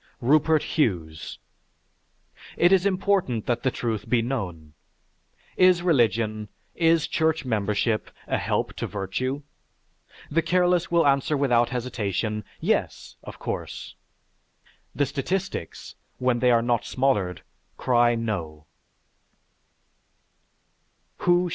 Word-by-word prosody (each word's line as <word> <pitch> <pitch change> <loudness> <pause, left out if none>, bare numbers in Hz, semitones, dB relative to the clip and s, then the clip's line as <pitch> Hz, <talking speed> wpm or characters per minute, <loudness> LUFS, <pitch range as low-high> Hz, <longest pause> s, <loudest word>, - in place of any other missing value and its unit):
RUPERT 150 +4 +3
HUGHES 85 - -2 1.2
It 175 - +4
is 190 0 +4
important 185 - 0
that 120 -1 0
the 130 - +2
truth 115 -5 -3
be 120 -2 +3
known. 90 - -4 0.8
Is 185 -1 +5
religion, 110 - +1 0.2
is 165 -1 +3
church 160 -2 0
membership 110 -1 0 0.2
a - - -1
help - - -1
to - - -3
virtue? 130 +8 -3 0.9
The 165 +3 +3
careless 180 +1 +2
will 170 -2 +3
answer 140 +1 +2
without 120 -4 +3
hesitation, 110 -4 -2 0.2
"Yes!" - - -1
Of - - -9
course. - - -5 1.0
The 145 - +2
statistics, 150 - -4 0.2
when 125 -1 +1
they 125 +1 +3
are 115 -1 +4
not 120 -1 +1
smothered, 110 -11 0 0.3
cry, 120 -1 +3
"No!" 85 -10 -4
125 Hz, 105 wpm, -25 LUFS, 110-160 Hz, 1.2 s, Is